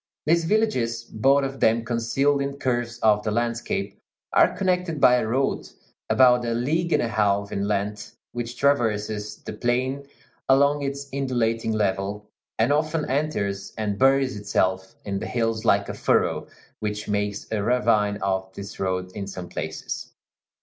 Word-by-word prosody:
These 165 +1 +3
villages, 130 - +1
both 135 +6 +2
of 135 0 -4
them 115 +1 +3
concealed 135 +5 +1
in 140 0 -3
curves 120 -3 -1
of 105 -1 +4
the 110 - -2
landscape, 115 -3 -2 0.3
are - - +4
connected 180 -4 0
by 125 -1 +6
a 115 - -1
road 130 +4 -1 0.4
about 125 -1 +5
a 115 -1 -1
league 160 +8 0
and - - +3
a - - 0
half 100 -2 +1
in 100 0 -1
length, 105 0 -3
which 120 0 -5
traverses 105 -6 0
the - - -6
plain 130 +3 -1 0.4
along 140 +2 +4
its 140 0 -4
undulating 115 -5 0
level, 100 0 -2 0.3
and 115 +6 +3
often 155 +1 0
enters 100 -9 -2
and 105 -2 -2
buries 135 -1 +3
itself 95 -2 -1
in 100 -1 -2
the - - -5
hills 115 -2 -1
like 100 -2 +3
a - - -4
furrow, - - +1 0.3
which 105 0 -3
makes 105 -1 -1
a 110 -2 0
ravine 105 -3 +2
of 95 -1 -1
this 100 0 -8
road 95 -1 -2
in 100 0 -6
some 90 -2 -7
places. - - -5
115 Hz, 155 wpm, -24 LUFS, 105-135 Hz, 0.4 s, by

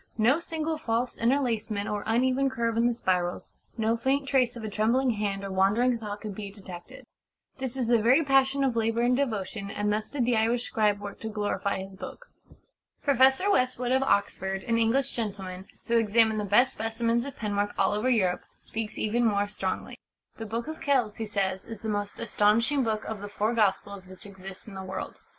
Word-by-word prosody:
No 240 +8 +4
single 320 -2 -3
false 235 -3 -1
interlacement 230 -5 0
or 205 -1 -2
uneven 255 +4 +2
curve 235 -3 -1
in 230 +1 +3
the 240 - +1
spirals, 180 -5 -1 0.2
no 225 0 +2
faint 270 +4 0
trace 255 -3 +2
of 235 - -7
a - - -3
trembling 230 +5 +2
hand 205 -2 -2
or 195 - -4
wandering 205 +7 +3
thought 210 -2 -6
can 215 - -5
be 200 0 -6
detected. 190 -3 -11 0.5
This 260 0 -3
is 255 - 0
the 235 -1 +3
very 255 +8 +5
passion 270 0 +3
of 260 -3 +1
labour 225 0 +1
and 245 +1 +3
devotion, 215 -6 -2
and 205 +1 -1
thus 215 0 -2
did 270 -5 -1
the 240 0 +2
Irish 230 +2 +2
scribe 210 -3 +1
work 205 0 -8
to 220 - -5
glorify 205 -2 -2
his 195 0 -11
book." - - -9 0.7
Professor 270 +7 +4
Westwood, 255 -4 +1
of 260 +1 +3
Oxford 195 -5 0
an 230 -2 +1
English 235 +4 +2
gentleman 195 -4 -5 0.2
who 235 0 +3
examined 220 0 +3
the 210 - -2
best 245 +7 +4
specimens 230 +1 0
of 280 0 -7
penwork 205 -1 -1
all - - +2
over 210 +5 0
Europe, 190 -8 +2 0.2
speaks 220 -1 -5
even 230 +3 +1
more 205 -3 +2
strongly. 195 -2 -4 0.4
"The 225 - -6
Book 230 +4 -3
of 315 0 -6
Kells," 255 -7 +1
he 225 - -4
says, 190 -2 -1
"is 225 -3 -8
the 220 - -3
most 205 -1 -3
astonishing 230 +5 +2
book 220 -2 -1
of 220 -2 -5
the 205 - -6
Four 210 +3 0
Gospels 200 -3 0
which 185 +1 -11
exists 195 0 -10
in 210 - -9
the 190 - -6
world. 190 0 -6
225 Hz, 200 wpm, -28 LUFS, 205-245 Hz, 0.7 s, very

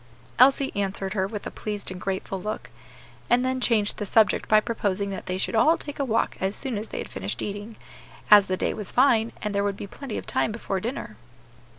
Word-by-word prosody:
Elsie 270 +2 +5
answered 195 -1 -2
her 190 -2 0
with 205 0 -6
a - - -4
pleased 210 -3 -4
and 180 - -7
grateful 195 0 -3
look; 215 +3 -5 0.6
and 245 +1 +4
then 260 0 -1
changed 215 -4 +2
the 205 - -2
subject 215 0 +3
by 215 - +7
proposing 200 -3 -1
that 190 - -6
they 185 0 -1
should 190 - -1
all 310 +9 +4
take 290 -1 -7
a - - +2
walk 230 -4 0
as 190 +2 0
soon 265 -4 -3
as 210 +2 -4
they - - -6
had - - -4
finished 95 +1 -4
eating, 205 +2 -5 0.6
as 205 -2 +9
the 185 - -1
day - - 0
was 205 -4 -3
fine, 235 -3 +4
and 210 -1 -2
there 200 0 +1
would 200 -1 -1
be - - -6
plenty 235 +4 -7
of - - -6
time - - 0
before 205 -3 -3
dinner. 220 - -5
210 Hz, 225 wpm, -25 LUFS, 195-230 Hz, 0.6 s, as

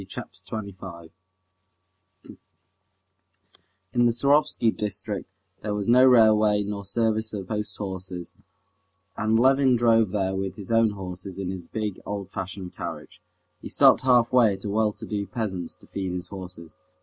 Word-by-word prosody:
Chapter 95 - -8
25 95 -6 -7 2.8
In 120 0 +3
the - - +3
Surovsky 140 -2 +3
district 105 -1 -4 0.3
there 105 -1 -2
was 100 -1 -3
no 125 +2 +6
railway 110 -4 +5
nor 100 0 -5
service 110 +2 0
of 100 -3 -5
post 105 -1 -3
horses, 95 -3 -6 0.8
and 110 +1 +1
Levin 135 0 +4
drove 115 -3 +4
there 95 -1 -1
with 95 -1 -3
his 100 +1 -7
own 115 -2 +4
horses 95 -1 -7
in 95 -2 -3
his 90 -3 -7
big, 105 -3 -4
old 100 -2 -5
fashioned 95 -1 -6
carriage. 80 -3 -7 0.4
He - - -7
stopped - - +5
halfway 125 -3 +4
at 95 - -11
a - - -2
well 110 0 +2
to 105 +2 -10
do 100 -2 -3
peasant's 95 -5 -4
to - - -19
feed 95 -2 -4
his 90 0 -4
horses. 90 -4 -9
105 Hz, 150 wpm, -25 LUFS, 95-110 Hz, 2.8 s, no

